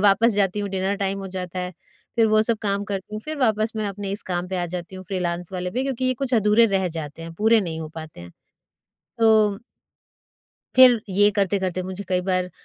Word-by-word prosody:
वापस 220 +4 +5
जाती 200 0 +1
हूँ 205 - -2
डिनर 190 +1 -1
टाइम 195 -1 -2
हो 195 - -6
जाता 180 0 -4
है, 180 0 -3 0.4
फिर 225 -1 +5
वो 215 0 +4
सब 225 0 0
काम 200 -1 0
करती 200 0 -5
हूँ, 215 - -4
फिर 310 0 -4
वापस 220 -2 +2
मैं 215 -1 -1
अपने 200 0 -5
इस 205 - -4
काम 175 0 -2
पे 190 - -3
आ 175 - -1
जाती 180 +2 -6
हूँ, 185 - -9
फ्रीलांस 180 -2 -3
वाले 180 -1 -3
पे, 250 +7 -1
क्योंकि 265 -2 -2
ये 255 0 +2
कुछ 255 -1 -1
अधूरे 215 +1 +5
रह 190 -1 0
जाते 150 +1 -7
हैं, 165 0 -7
पूरे 220 +5 +4
नहीं 165 -4 -4
हो 155 - -5
पाते 155 - -9
हैं 85 0 -10 0.9
तो 215 -3 +4 1.2
फिर 250 -3 +7
ये 205 +2 +4
करते-करते 190 -2 0
मुझे 190 +2 -6
कई 185 -1 +1
बार, 185 0 -1
195 Hz, 220 wpm, -23 LUFS, 180-215 Hz, 1.2 s, फिर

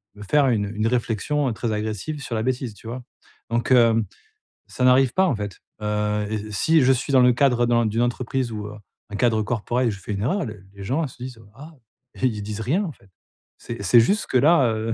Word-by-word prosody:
me 105 - -10
faire 140 +6 +3
une 105 -4 +1
une 110 +1 0
réflexion 125 +4 0
très 115 +1 -3
agressive 110 +8 -4
sur - - -6
la 110 - -1
bêtise, 125 -3 -2
tu 110 - -14
vois? 125 +2 -6 0.5
Donc, 120 +2 -1
hem, 115 -3 +5 0.6
ça 125 - -4
n'arrive 130 -1 +4
pas 190 - +3
en 135 - +1
fait, 105 -3 -6 0.2
heu 105 0 -1
et 110 0 -4
si 160 +9 +3
je 130 +1 +4
suis 135 +3 -3
dans 130 - +6
le 125 0 +6
cadre 120 -1 +3
d'un 120 -1 +2
d'une 110 +2 0
entreprise 120 +1 -2
ou, 105 -1 -5
heu, 105 - -8 0.4
un - - -5
cadre 115 -2 +2
corporate, 120 +3 -1
je 100 -3 -5
fais 105 - -5
une 100 - -3
erreur, 145 - 0
les 110 -3 -7 0.2
les 100 - -10
gens 150 +7 0
se 125 - -16
disent: 125 -3 -8
«ah» 150 +6 -11 0.5
ils 110 -5 +1
disent 105 +1 -5
rien 155 - 0
en 160 - -4
fait. 100 - -24 0.5
C'est 115 -3 -7
c'est 115 +5 +6
juste 200 - +2
que 130 - +2
là, 145 -1 +5
heu, 110 +1 -2
120 Hz, 225 wpm, -23 LUFS, 105-130 Hz, 0.6 s, dans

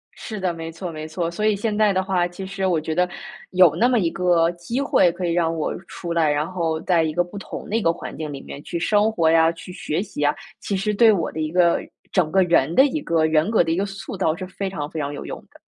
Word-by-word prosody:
是 215 -2 -7
的， 185 -2 -1
没 165 0 -6
错 170 +2 -6
没 155 -1 -6
错。 165 +1 -2
所 190 +5 -3
以 215 -1 +3
现 210 +1 -2
在 210 -1 +3
的 190 0 +1
话， 185 -2 +1
其 175 +2 -8
实 195 0 -3
我 175 -3 +2
觉 155 +1 -3
得， 180 +2 +1 0.4
有 180 -4 +5
那 240 - +3
么 245 -3 +3
一 170 - +1
个 175 -2 +2
机 175 +9 -4
会 230 -10 +3
可 180 +1 -4
以 170 - 0
让 165 -1 +1
我 155 - -2
出 170 -2 -5
来， 165 -2 +2
然 150 +4 -1
后 165 -3 -1
在 170 -3 +2
一 155 - -1
个 175 - +2
不 175 +4 -10
同 195 - -7
的 210 - -1
一 230 - +2
个 165 - +3
环 170 - -7
境 155 -2 -5
里 140 -1 -7
面 140 - -9
去 175 - -4
生 210 +5 +2
活 165 -6 +2
呀， 165 0 +5
去 170 +2 -10
学 165 -1 -2
习 195 -7 -6
呀， 145 0 +3 0.3
其 200 - -3
实 210 +3 -1
对 220 +2 +6
我 175 -6 0
的 160 - -6
一 155 0 -2
个 175 -1 +3 0.3
整 170 -5 +1
个 190 +1 +4
人 170 -3 +2
的 265 - +7
一 295 +2 -1
个 165 - +1
人 160 +4 +2
格 225 - +4
的 165 - -2
一 - - +1
个 195 +3 0
塑 195 0 -7
造 170 -4 +1
是 185 +1 -6
非 195 +1 -4
常 150 -6 -5
非 160 - -5
常 145 0 -3
有 145 - -7
用 - - -6
的。 - - -19
175 Hz, 305 characters per minute, -22 LUFS, 160-195 Hz, 0.4 s, 的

